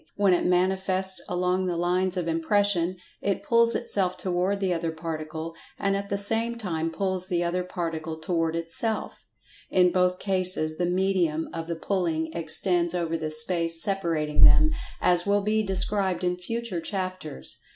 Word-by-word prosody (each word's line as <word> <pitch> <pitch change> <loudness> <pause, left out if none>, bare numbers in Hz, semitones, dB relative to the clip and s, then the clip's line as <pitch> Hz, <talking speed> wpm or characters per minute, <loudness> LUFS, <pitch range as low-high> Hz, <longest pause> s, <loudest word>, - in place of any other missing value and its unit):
When 200 -2 +3
it 175 - +1
manifests 190 +1 +1
along 180 +1 0
the 175 -1 -1
lines 180 +2 0
of 175 -2 -2
Impression, 180 +2 +1 0.3
it 200 -1 -1
pulls 235 0 +4
itself 190 -6 -1
toward 185 +2 -1
the 190 -2 +1
other 165 -1 -2
Particle, 160 0 -5 0.2
and 195 0 0
at 200 0 -4
the 200 - 0
same 225 +3 0
time 165 -8 -2
pulls 185 +2 -1
the 175 -2 0
other 180 +1 -1
Particle 165 -3 -4
toward 165 0 -1
itself. 170 +7 -3 0.5
In 180 -1 +4
both 180 0 +2
cases 185 -5 +2
the 175 - +1
"medium" 180 -4 0
of 165 0 -5
the 170 - -2
pulling 165 -3 -1
extends 170 +2 0
over 165 -2 -1
the 160 -1 -3
space 165 +1 0
separating 165 -7 +1
them, 310 - +7 0.3
as 175 +1 +4
will 205 0 +2
be 215 +1 +1
described 195 -2 +1
in 180 0 +1
future 195 0 -4
chapters. 185 - -3
180 Hz, 160 wpm, -26 LUFS, 165-195 Hz, 0.5 s, them